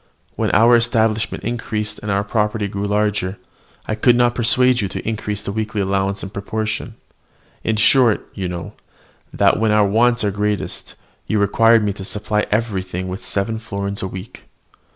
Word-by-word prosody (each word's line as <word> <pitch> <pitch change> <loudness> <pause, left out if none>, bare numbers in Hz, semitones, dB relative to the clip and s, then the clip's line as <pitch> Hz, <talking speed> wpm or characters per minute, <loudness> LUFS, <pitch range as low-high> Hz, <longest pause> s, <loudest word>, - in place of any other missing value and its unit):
When - - 0
our 115 +2 +5
establishment 115 -2 +1
increased 110 -2 -3
and 105 - -6
our 100 0 +1
property 105 0 0
grew 100 +1 -3
larger, 105 -2 0 0.5
I - - -2
could 120 +3 +4
not 120 0 +3
persuade 125 +1 +3
you 100 - -1
to - - -6
increase 105 -2 -3
the - - -3
weekly 110 0 -3
allowance 95 0 0
in 95 - -6
proportion: 110 +1 -3 0.7
in 110 - 0
short, 115 +1 +4
you 95 -2 -3
know, 85 -2 -6 0.6
that, - - +3
when 110 0 +2
our 105 -1 +4
wants 120 +4 +2
were 105 - +1
greatest, 105 0 -3 0.3
you 110 - 0
required 115 +2 +4
me 100 -1 0
to 95 - -9
supply 105 +1 -2
everything 95 -4 -2
with 95 +1 -6
seven 110 +3 -2
florins 100 -2 -4
a 95 - -2
week. 95 +3 -9
105 Hz, 170 wpm, -20 LUFS, 100-110 Hz, 0.7 s, our